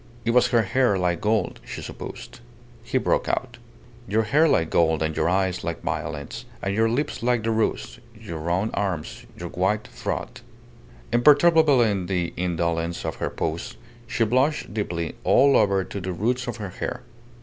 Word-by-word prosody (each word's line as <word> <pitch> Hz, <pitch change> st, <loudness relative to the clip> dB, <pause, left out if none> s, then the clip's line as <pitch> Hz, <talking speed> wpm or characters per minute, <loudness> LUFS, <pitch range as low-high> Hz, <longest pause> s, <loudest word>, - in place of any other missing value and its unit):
It 115 Hz, -, +2 dB
was 125 Hz, +1 st, +5 dB
her 120 Hz, -2 st, +3 dB
hair 110 Hz, 0 st, +2 dB
like 90 Hz, -2 st, 0 dB
gold, 105 Hz, -2 st, 0 dB
she -, -, -7 dB
supposed. -, -, -8 dB, 0.4 s
He -, -, -1 dB
broke -, -, +1 dB
out -, -, -2 dB, 0.5 s
"Your 110 Hz, +3 st, +2 dB
hair 150 Hz, +9 st, +4 dB
like 80 Hz, -, +2 dB
gold, 80 Hz, -2 st, +3 dB
and 80 Hz, 0 st, -2 dB
your 80 Hz, +1 st, +1 dB
eyes 95 Hz, 0 st, 0 dB
like 85 Hz, 0 st, -4 dB
violets, 80 Hz, -, -4 dB
and 100 Hz, -, -2 dB
your 110 Hz, +2 st, +2 dB
lips 140 Hz, +6 st, -2 dB
like 120 Hz, -1 st, +1 dB
the 115 Hz, -, 0 dB
rose; -, -, -1 dB, 0.2 s
your 80 Hz, -1 st, -6 dB
round 90 Hz, +7 st, -1 dB
arms, 95 Hz, -6 st, -3 dB
your 85 Hz, 0 st, -6 dB
white 95 Hz, +5 st, 0 dB
throat."... -, -, -5 dB, 0.7 s
Imperturbable 145 Hz, +1 st, +6 dB
in 100 Hz, -5 st, 0 dB
the 90 Hz, -3 st, -1 dB
indolence 85 Hz, -1 st, -1 dB
of -, -, -3 dB
her -, -, -2 dB
pose, 80 Hz, +1 st, -4 dB, 0.3 s
she 115 Hz, -, +1 dB
blushed 130 Hz, +2 st, +1 dB
deeply 85 Hz, -6 st, -2 dB
all 140 Hz, +1 st, +5 dB
over 100 Hz, -2 st, +3 dB
to 100 Hz, +2 st, -6 dB
the 90 Hz, 0 st, -3 dB
roots 125 Hz, +7 st, -1 dB
of 120 Hz, -2 st, -4 dB
her 105 Hz, -3 st, -5 dB
hair. -, -, -5 dB
100 Hz, 170 wpm, -24 LUFS, 85-120 Hz, 0.7 s, Imperturbable